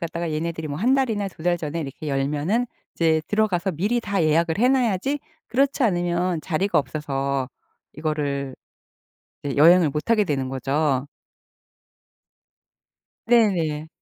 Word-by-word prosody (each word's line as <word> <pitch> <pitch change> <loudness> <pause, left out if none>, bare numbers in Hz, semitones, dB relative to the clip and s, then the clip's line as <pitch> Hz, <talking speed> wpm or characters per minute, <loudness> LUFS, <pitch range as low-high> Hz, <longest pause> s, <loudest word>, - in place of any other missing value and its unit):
갖다가 170 -1 -3
얘네들이 160 0 -3
뭐 145 0 -4
1 250 +7 +3
달이나 220 -7 0
2 160 - -14
달 175 0 +1
전에 160 +1 -4
이렇게 150 +1 -6
열면은 150 - 0 0.3
이제 160 -1 +2
들어가서 200 -3 +1
미리 205 +9 0
다 200 -5 -1
예약을 160 +2 +2
해 245 +3 +4
놔야지 260 +1 +1 0.3
그렇지 275 +3 +1
않으면 175 -4 +1
자리가 185 +4 0
없어서 140 -3 -2 0.4
이거를 145 -4 -3 0.9
네 140 -1 -3
여행을 165 +1 +6
못 150 +10 -4
하게 215 -3 +4
되는 135 -6 -1
거죠. 135 +1 0 2.2
네네. 170 -10 +2
165 Hz, 275 characters per minute, -23 LUFS, 150-205 Hz, 2.2 s, 여행을